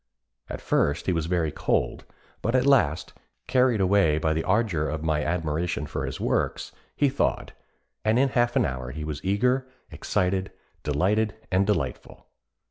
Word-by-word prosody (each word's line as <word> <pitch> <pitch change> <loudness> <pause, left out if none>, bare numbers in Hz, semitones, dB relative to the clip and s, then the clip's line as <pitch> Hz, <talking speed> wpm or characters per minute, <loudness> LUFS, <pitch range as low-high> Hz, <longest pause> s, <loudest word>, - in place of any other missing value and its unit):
At - - -6
first 75 +4 +1
he 95 - +1
was 80 -1 -1
very 85 -3 0
cold, - - -1 0.4
but 115 +3 0
at 130 0 +3
last, 105 - +2 0.3
carried 125 -3 +3
away 95 -5 +3
by 80 0 +1
the 80 +1 -1
ardour 95 -7 +1
of 80 0 -4
my 75 -2 0
admiration 85 -1 -1
for 75 - -4
his - - -5
works, - - -1 0.2
he 145 - +3
thawed, 135 0 -1 0.5
and 110 +2 +2
in 135 +1 +3
half 120 -1 +1
an - - +3
hour 65 -2 -4
he 75 +4 -6
was 75 -2 -5
eager, 125 +7 +1 0.2
excited, 95 +1 -1 0.3
delighted 100 +9 +1 0.2
and 95 +1 +2
delightful." 80 -12 -3
90 Hz, 160 wpm, -26 LUFS, 80-110 Hz, 0.5 s, at